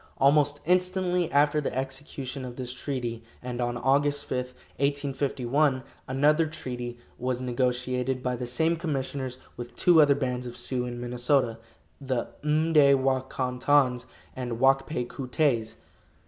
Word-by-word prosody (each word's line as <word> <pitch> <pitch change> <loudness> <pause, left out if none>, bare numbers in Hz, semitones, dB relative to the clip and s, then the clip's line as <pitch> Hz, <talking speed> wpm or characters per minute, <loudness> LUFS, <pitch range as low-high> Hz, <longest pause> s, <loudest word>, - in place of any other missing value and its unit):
Almost 145 +1 +3
instantly 180 0 +1
after 145 +1 +3
the 135 - -3
execution 135 0 -5
of 125 -1 -7
this 125 -1 -5
treaty, 125 -3 -4 0.2
and 125 0 -4
on 120 0 -1
Aug. 135 +4 +3 0.2
5, 145 - -4 0.4
1851, 140 -1 0 0.2
another 150 +5 +3
treaty 125 -5 -6 0.2
was 125 0 -1
negotiated 125 +1 -1
by 125 -1 0
the 125 0 -5
same 160 +7 +1
commissioners 135 -5 -3 0.2
with 120 0 -8
two 170 -3 +6
other 145 -2 +5
bands 125 -3 -2
of 120 - -8
Sioux 125 -2 -2
in 120 0 -5
Minnesota, 120 -1 +1 0.4
the 130 -3 -1
M'day 150 -2 +5
wa 130 0 +2
kon 130 -1 -4
tons 130 -3 +3 0.3
and 120 -3 -4
Wak 135 +1 +4
pay 140 -6 -2
koo 130 +2 -7
tays. 120 -5 +1
130 Hz, 145 wpm, -27 LUFS, 125-145 Hz, 0.4 s, two